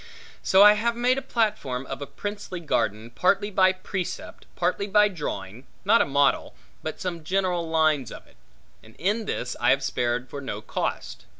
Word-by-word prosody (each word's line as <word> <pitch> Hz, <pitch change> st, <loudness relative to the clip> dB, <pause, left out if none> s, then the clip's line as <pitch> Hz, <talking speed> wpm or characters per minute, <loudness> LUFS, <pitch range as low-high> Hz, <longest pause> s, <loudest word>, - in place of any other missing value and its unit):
So 190 Hz, +1 st, +6 dB
I 210 Hz, 0 st, +9 dB
have 230 Hz, +3 st, 0 dB
made 250 Hz, +2 st, +2 dB
a -, -, -10 dB
platform 205 Hz, -, -1 dB
of -, -, -6 dB
a 140 Hz, -, -5 dB
princely 205 Hz, -3 st, -6 dB
garden, 110 Hz, -8 st, -1 dB
partly 200 Hz, -, +1 dB
by 185 Hz, -1 st, +4 dB
precept, 185 Hz, -1 st, -6 dB
partly 180 Hz, +3 st, 0 dB
by 210 Hz, +1 st, +4 dB
drawing, 125 Hz, -, -6 dB, 0.2 s
not 225 Hz, +4 st, +5 dB
a -, -, +1 dB
model, 140 Hz, +1 st, +1 dB, 0.3 s
but -, -, -5 dB
some 170 Hz, -3 st, -4 dB
general 180 Hz, -1 st, 0 dB
lines 155 Hz, -6 st, +2 dB
of -, -, -10 dB
it; -, -, -24 dB, 0.4 s
and 110 Hz, 0 st, -18 dB
in 210 Hz, +5 st, -1 dB
this 125 Hz, -10 st, -3 dB
I -, -, +2 dB
have 140 Hz, -, +3 dB
spared 120 Hz, 0 st, -1 dB
for 140 Hz, +3 st, -7 dB
no 105 Hz, -6 st, -5 dB
cost. 110 Hz, -, -4 dB
175 Hz, 180 wpm, -25 LUFS, 135-205 Hz, 0.4 s, I